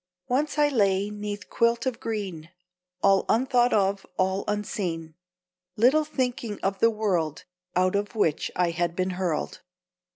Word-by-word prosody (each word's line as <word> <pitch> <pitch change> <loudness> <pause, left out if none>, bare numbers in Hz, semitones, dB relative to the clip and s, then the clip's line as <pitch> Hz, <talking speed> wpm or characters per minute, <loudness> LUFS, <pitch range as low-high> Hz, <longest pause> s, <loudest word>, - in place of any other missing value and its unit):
Once 290 +5 0
I 295 0 +5
lay 200 -6 +2
'neath 205 0 -5
quilt 235 0 +1
of 255 -3 -2
green, 190 -8 -4 0.5
All 195 -1 +5
unthought 245 +1 +3
of, 200 -1 +2
all 190 +1 +1
unseen; 180 -6 -3 0.6
Little 265 +8 +4
thinking 250 -7 -2
of 195 0 0
the 230 - +5
world 185 -9 -1 0.3
Out 185 +1 +2
of 205 +3 -2
which 160 -8 +1
I 175 -1 +2
had 170 0 -1
been 185 +1 0
hurled. 180 -4 -2
205 Hz, 140 wpm, -26 LUFS, 185-230 Hz, 0.6 s, I